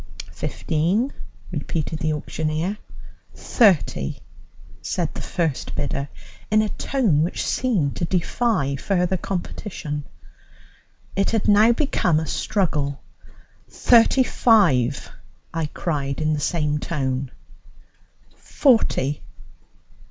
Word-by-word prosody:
"Fifteen," 185 Hz, -, -1 dB, 0.4 s
repeated 160 Hz, -1 st, -3 dB
the 155 Hz, 0 st, 0 dB
auctioneer. 155 Hz, +6 st, -2 dB, 0.6 s
"Thirty," 185 Hz, -, +2 dB, 0.6 s
said -, -, -2 dB
the -, -, -6 dB
first 165 Hz, -7 st, -2 dB
bidder 140 Hz, 0 st, -3 dB, 0.4 s
in 215 Hz, 0 st, +4 dB
a 215 Hz, -, -2 dB
tone 210 Hz, -, +1 dB
which 170 Hz, +4 st, -1 dB
seemed 195 Hz, -, 0 dB
to 170 Hz, -, 0 dB
defy 175 Hz, -, 0 dB
further 180 Hz, +3 st, 0 dB
competition. 170 Hz, -5 st, -5 dB, 1.1 s
It 195 Hz, -, +1 dB
had 225 Hz, -3 st, 0 dB
now 210 Hz, +3 st, +6 dB
become 185 Hz, -, +1 dB
a 160 Hz, -, -3 dB
struggle. 150 Hz, -5 st, -1 dB, 0.7 s
"Thirty 240 Hz, +2 st, +4 dB
five," 150 Hz, -, +3 dB, 0.4 s
I 165 Hz, -2 st, -1 dB
cried 140 Hz, -4 st, -3 dB
in 155 Hz, 0 st, +1 dB
the 150 Hz, -, -1 dB
same 150 Hz, -1 st, 0 dB
tone. 135 Hz, -4 st, -2 dB, 1.1 s
"Forty." 220 Hz, -, +1 dB
165 Hz, 100 wpm, -23 LUFS, 145-210 Hz, 1.1 s, now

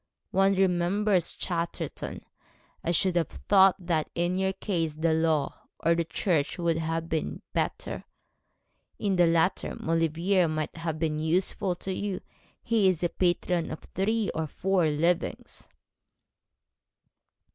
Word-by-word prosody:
One 195 Hz, +1 st, +3 dB
remembers 185 Hz, 0 st, +2 dB
Chatterton. 170 Hz, -2 st, -4 dB, 0.6 s
I -, -, -2 dB
should 175 Hz, +2 st, +2 dB
have 170 Hz, -3 st, +2 dB
thought 195 Hz, -2 st, +4 dB
that 170 Hz, -4 st, -1 dB
in 175 Hz, +1 st, +1 dB
your 190 Hz, 0 st, +1 dB
case 165 Hz, -5 st, -2 dB
the 160 Hz, +1 st, +1 dB
law 160 Hz, -2 st, 0 dB
or 165 Hz, -, +3 dB
the 170 Hz, 0 st, 0 dB
church 160 Hz, -3 st, 0 dB
would 170 Hz, -2 st, +1 dB
have 165 Hz, 0 st, -2 dB
been 160 Hz, -1 st, -3 dB
better. -, -, -2 dB, 0.9 s
In 200 Hz, -2 st, 0 dB
the 175 Hz, -1 st, +5 dB
latter 165 Hz, +2 st, +1 dB
Maulevrier 165 Hz, +3 st, +1 dB
might 155 Hz, -1 st, -3 dB
have 165 Hz, -1 st, -3 dB
been 155 Hz, -1 st, -1 dB
useful 180 Hz, +3 st, 0 dB
to 190 Hz, +2 st, -4 dB
you. 195 Hz, -1 st, -3 dB, 0.4 s
He 220 Hz, -4 st, +3 dB
is 180 Hz, -1 st, 0 dB
patron 175 Hz, -1 st, +1 dB
of 155 Hz, -, -6 dB
three 215 Hz, +2 st, 0 dB
or 160 Hz, -1 st, -2 dB
four 185 Hz, +1 st, +1 dB
livings.' 165 Hz, +4 st, -1 dB
175 Hz, 130 wpm, -28 LUFS, 160-190 Hz, 0.9 s, the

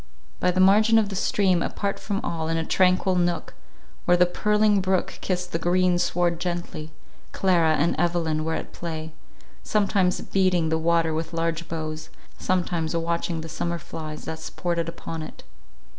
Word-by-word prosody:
By 180 Hz, -, +2 dB
the 180 Hz, +1 st, 0 dB
margin 215 Hz, +4 st, +6 dB
of 215 Hz, -2 st, +2 dB
the 195 Hz, -, -5 dB
stream, 185 Hz, -2 st, +2 dB
apart 200 Hz, +3 st, -2 dB
from 200 Hz, 0 st, -3 dB
all, 165 Hz, -10 st, -3 dB
in 165 Hz, 0 st, 0 dB
a 165 Hz, -, -1 dB
tranquil 185 Hz, +1 st, +3 dB
nook, 175 Hz, -1 st, 0 dB, 0.5 s
where 175 Hz, 0 st, +4 dB
the 180 Hz, -, +6 dB
purling 210 Hz, +2 st, +2 dB
brook 185 Hz, -1 st, -1 dB
kissed 180 Hz, -1 st, -2 dB
the 165 Hz, -, -1 dB
green 180 Hz, +1 st, +2 dB
sward 175 Hz, -1 st, +1 dB
gently, 170 Hz, -3 st, -4 dB, 0.4 s
Clara 170 Hz, -4 st, +3 dB
and 155 Hz, +3 st, +1 dB
Evelyn 165 Hz, -2 st, 0 dB
were 160 Hz, 0 st, -1 dB
at -, -, -6 dB
play, 160 Hz, -2 st, -5 dB, 0.5 s
sometimes 195 Hz, -3 st, +1 dB
beating 185 Hz, -4 st, +1 dB
the 160 Hz, 0 st, +1 dB
water 165 Hz, 0 st, +2 dB
with 160 Hz, +1 st, -3 dB
large 165 Hz, 0 st, -1 dB
boughs, 155 Hz, -1 st, -5 dB, 0.3 s
sometimes 175 Hz, -3 st, -1 dB
watching 170 Hz, 0 st, -1 dB
the 160 Hz, -, -7 dB
summer 170 Hz, +2 st, -3 dB
flies 155 Hz, -2 st, -7 dB
that 160 Hz, 0 st, -5 dB
sported 170 Hz, 0 st, -2 dB
upon 165 Hz, -1 st, -6 dB
it. 155 Hz, -, -9 dB
170 Hz, 165 wpm, -25 LUFS, 160-185 Hz, 0.5 s, margin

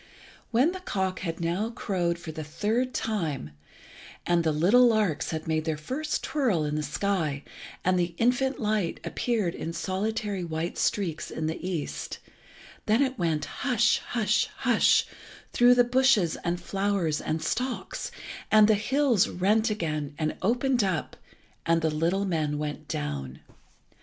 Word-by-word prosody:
When 255 Hz, +8 st, +3 dB
the 375 Hz, -, -6 dB
cock 190 Hz, -, -2 dB
had 165 Hz, -3 st, -4 dB
now 175 Hz, +6 st, -1 dB
crowed 180 Hz, -7 st, -1 dB
for 170 Hz, -2 st, -7 dB
the 155 Hz, 0 st, -6 dB
third 220 Hz, +11 st, -1 dB
time, 165 Hz, -, -2 dB, 0.7 s
and 175 Hz, -1 st, +2 dB
the 160 Hz, -, +2 dB
little 195 Hz, +12 st, +5 dB
larks 215 Hz, -9 st, +1 dB
had 160 Hz, -1 st, -4 dB
made 155 Hz, 0 st, 0 dB
their 160 Hz, -2 st, -1 dB
first 275 Hz, -, -3 dB
twirl 230 Hz, -, +1 dB
in 150 Hz, -, -2 dB
the 155 Hz, -, 0 dB
sky, 155 Hz, -2 st, -1 dB, 0.4 s
and 185 Hz, 0 st, +3 dB
the 170 Hz, -1 st, -1 dB
infant 250 Hz, +3 st, +1 dB
light 210 Hz, -5 st, 0 dB
appeared 215 Hz, -8 st, -1 dB
in 165 Hz, -, -5 dB
solitary 200 Hz, +2 st, -2 dB
white 165 Hz, +1 st, -3 dB
streaks 175 Hz, -6 st, -1 dB
in 160 Hz, -, -4 dB
the 160 Hz, +2 st, -3 dB
east, 175 Hz, -5 st, -4 dB, 0.7 s
then 220 Hz, +6 st, +4 dB
it 260 Hz, -3 st, -2 dB
went 160 Hz, -3 st, 0 dB
hush, 245 Hz, -3 st, +1 dB
hush, 215 Hz, -2 st, 0 dB
hush, -, -, +4 dB, 0.5 s
through 245 Hz, +1 st, +6 dB
the 245 Hz, -, +6 dB
bushes 245 Hz, -8 st, +3 dB
and 175 Hz, 0 st, -1 dB
flowers 195 Hz, -3 st, -1 dB
and 155 Hz, 0 st, -2 dB
stalks, 250 Hz, +9 st, -3 dB, 0.4 s
and 215 Hz, -1 st, +7 dB
the 220 Hz, -, +5 dB
hills 235 Hz, 0 st, +2 dB
rent 210 Hz, +5 st, +2 dB
again, 155 Hz, -8 st, -3 dB
and 155 Hz, -1 st, -1 dB
opened 245 Hz, +2 st, +2 dB
up, 185 Hz, -5 st, -2 dB, 0.5 s
and 165 Hz, 0 st, +2 dB
the 160 Hz, -, +2 dB
little 170 Hz, +6 st, +1 dB
men 155 Hz, -5 st, -1 dB
went 150 Hz, 0 st, -4 dB
down. 70 Hz, -2 st, -4 dB
185 Hz, 150 wpm, -27 LUFS, 160-225 Hz, 0.7 s, and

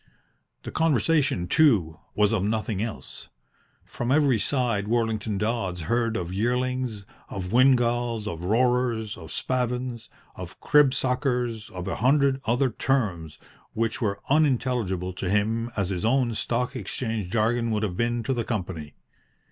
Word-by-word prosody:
The -, -, -6 dB
conversation, 150 Hz, -, +2 dB
too, 95 Hz, -, +3 dB, 0.2 s
was 105 Hz, +1 st, +3 dB
of 100 Hz, -4 st, +1 dB
nothing 105 Hz, -1 st, -1 dB
else. 110 Hz, 0 st, -6 dB, 0.6 s
From 120 Hz, +1 st, -3 dB
every 140 Hz, -5 st, +3 dB
side 115 Hz, -3 st, 0 dB
Worlington 110 Hz, -2 st, 0 dB
Dodds 100 Hz, -5 st, -2 dB
heard 115 Hz, +6 st, 0 dB
of 90 Hz, 0 st, -4 dB
yearlings, 125 Hz, 0 st, -1 dB, 0.2 s
of 95 Hz, -1 st, -5 dB
windgalls, 120 Hz, -3 st, +3 dB
of 85 Hz, -3 st, -5 dB
roarers, 115 Hz, 0 st, +1 dB
of 80 Hz, -3 st, -11 dB
spavins, 125 Hz, -2 st, -2 dB, 0.3 s
of -, -, -9 dB
cribsuckers, 125 Hz, -5 st, +1 dB
of 90 Hz, -4 st, -7 dB
a -, -, -2 dB
hundred 135 Hz, +2 st, +3 dB
other 125 Hz, +3 st, +2 dB
terms 95 Hz, -, -1 dB, 0.4 s
which 115 Hz, +2 st, -1 dB
were 100 Hz, -3 st, 0 dB
as 140 Hz, -, +3 dB
unintelligible 120 Hz, -, 0 dB
to 90 Hz, 0 st, -4 dB
him 110 Hz, +4 st, 0 dB
as 100 Hz, -2 st, 0 dB
his 90 Hz, -2 st, -3 dB
own 120 Hz, +1 st, +2 dB
Stock 125 Hz, +4 st, -1 dB
Exchange 110 Hz, -6 st, -3 dB
jargon 115 Hz, +2 st, +1 dB
would 110 Hz, -1 st, 0 dB
have 95 Hz, -4 st, -2 dB
been 120 Hz, +2 st, 0 dB
to 135 Hz, -, 0 dB
the 120 Hz, -2 st, -1 dB
company. 90 Hz, -, -4 dB
115 Hz, 140 wpm, -25 LUFS, 105-125 Hz, 0.6 s, too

